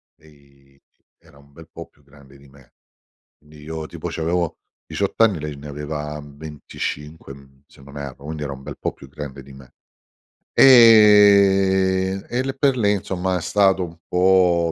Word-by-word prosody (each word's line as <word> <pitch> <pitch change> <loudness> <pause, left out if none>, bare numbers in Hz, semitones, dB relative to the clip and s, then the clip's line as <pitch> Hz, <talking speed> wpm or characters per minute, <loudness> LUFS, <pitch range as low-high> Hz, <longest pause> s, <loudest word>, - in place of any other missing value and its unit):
lei 70 -2 -25 0.4
era 85 -4 -22
un 70 0 -22
bel 80 +2 -15
po' 85 - -10
più - - -31
grande 70 0 -19
di 70 +1 -20
me. 70 -2 -22 0.7
Quindi 75 0 -18
io 80 0 -7
tipo 85 +1 -7
c'avevo 85 +1 -2 0.3
18 - - -4
anni, 105 -8 +3
lei 75 -1 -6
ne 70 +1 -11
aveva, 75 +1 -6
mhmm, 70 -1 -15
25 75 0 -8
mhmm, 70 0 -19
se 70 - -21
non 70 +1 -13
erro, 70 -1 -9
quindi 75 0 -6
era 70 -1 -5
un 65 - -12
bel - - -9
po' - - -4
più 70 - -16
grande 70 -1 -9
di 70 +1 -16
me. 65 -2 -16 0.8
Ehm, 100 -5 +5
e 120 +1 -1
le 135 0 -4
per 135 -1 0
lì 105 -3 0
somma 95 0 -3
è - - -5
stato 95 0 +1
un 85 -2 -9
po' 90 -2 +2
80 Hz, 175 wpm, -20 LUFS, 70-95 Hz, 0.8 s, Ehm